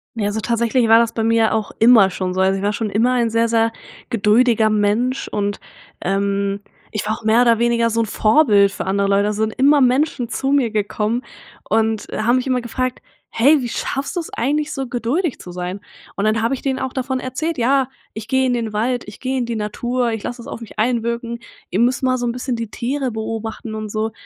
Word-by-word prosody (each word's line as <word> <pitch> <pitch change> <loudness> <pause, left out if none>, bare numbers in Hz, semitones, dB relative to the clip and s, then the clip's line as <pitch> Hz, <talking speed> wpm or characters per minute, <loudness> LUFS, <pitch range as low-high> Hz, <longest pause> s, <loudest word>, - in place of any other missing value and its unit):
Ja, 205 -2 -1
so 220 +1 -3
tatsächlich 235 +1 +1
war 225 +1 +8
das 230 -1 +2
bei 225 - -1
mir 225 -1 +3
auch 215 -2 -2
immer 220 -5 +6
schon 185 0 -3
so. 190 - +1
Also 190 +1 +2
ich - - -6
war 205 - +2
schon 215 -1 -3
immer 235 +5 +2
ein 235 -2 +1
sehr, 230 0 +2
sehr 230 0 +2 0.4
geduldiger 225 0 +3
Mensch 215 +5 0
und, 205 -1 -2 0.4
ähm, 200 +1 -1 0.3
ich 215 - -3
war 215 - -1
auch - - -15
mehr 220 +2 +4
oder 235 -2 +4
weniger 235 0 +2
so 230 +1 -1
'n - - 0
Vorbild 215 -3 +4
für - - -5
andere 200 +1 +1
Leute. 200 +1 +2
Also 210 +1 -2
sind 220 0 0
immer 280 +2 +5
Menschen 255 -1 +1
zu 270 +2 -1
mir 270 -5 +3
gekommen 215 +3 -1 0.4
und, 220 0 0
äh, - - -3
haben 235 +3 +3
mich 255 - 0
immer 255 -2 0
gefragt: 255 +2 -3 0.3
„Hey, 280 +6 +4
wie 240 - -3
schaffst 275 +9 -3
du - - 0
es 330 - -6
eigentlich 295 +5 -1
so 270 -1 -3
geduldig 255 +7 -1
zu 180 - -9
sein?“ 180 +2 -5 0.4
Und 200 - -1
dann 220 +1 +1
habe 235 - +1
ich 265 - -4
denen 265 -1 -1
auch 260 -1 -4
davon 260 0 -2
erzählt: 295 +6 -3
„Ja, 265 +2 +2 0.2
ich 220 0 -7
gehe 260 +1 +2
in 250 - +1
den 225 -3 -2
Wald, 245 +3 -1
ich 210 - -11
gehe 260 0 -2
in 240 - -2
die 235 - -3
Natur, 240 +3 -1
ich 225 -2 -3
lasse 245 0 -5
es - - -12
auf 235 - -7
mich 220 - -11
einwirken, 235 +1 -1 0.3
ihr 190 - 0
müsst 250 +3 +2
mal 255 -1 +2
so 245 - -1
'n - - 0
bisschen 250 0 -3
die 230 -2 -4
Tiere 260 +3 -2
beobachten 220 0 -5
und 215 -1 -5
so.“ 220 +1 -2
230 Hz, 235 wpm, -19 LUFS, 215-255 Hz, 0.4 s, war